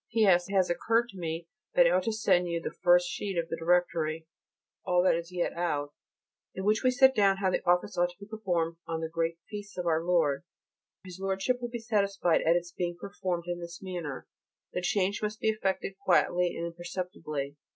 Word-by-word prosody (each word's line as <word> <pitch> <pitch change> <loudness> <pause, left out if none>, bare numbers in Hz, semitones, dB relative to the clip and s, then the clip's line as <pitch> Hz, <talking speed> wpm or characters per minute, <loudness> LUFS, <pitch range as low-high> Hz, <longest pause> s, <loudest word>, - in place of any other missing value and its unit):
P.S. 195 -6 +4
It - - -5
has 185 -2 +4
occurred 230 +6 +1
to 195 - -11
me 165 0 -3 0.3
that - - +7
I - - +5
ought - - +3
to 225 - +1
send 180 -5 +2
you 170 -1 -1
the - - -5
first 175 0 +5
sheet 190 +1 -4
of 165 0 -1
the - - -1
Directory 165 -2 +1 0.6
all 180 0 +2
that 185 - +5
is 170 +1 -3
yet 180 -1 -1
out 145 -4 -2 0.6
in 190 - -4
which 215 +4 +2
is 255 -1 +2
set 265 0 +7
down 200 -4 +4
how 190 -1 +1
the - - -1
Office 180 +2 +2
ought 175 0 +3
to 175 - -15
be 200 - -9
performed 175 -6 -2
on 165 -1 -3
the 160 - -2
great 165 0 -1
feasts 205 -2 -8
of 180 - -3
our 165 -1 +2
Lord. 165 -5 +2 0.6
His 185 -1 -10
Lordship 195 +6 -1
will 240 - -3
be 240 - -4
satisfied 200 -6 +1
at 165 +1 +3
its 175 0 -2
being 175 -1 -3
performed 185 -3 -3
in 175 0 -3
this 170 0 -8
manner. 175 -8 -5 0.5
The 180 - -1
change 195 +2 0
must 215 0 -3
be 220 - +1
effected 195 -2 -1
quietly 180 -1 +2
and 170 - -3
imperceptibly. 170 -4 -5
180 Hz, 210 wpm, -29 LUFS, 170-200 Hz, 0.6 s, that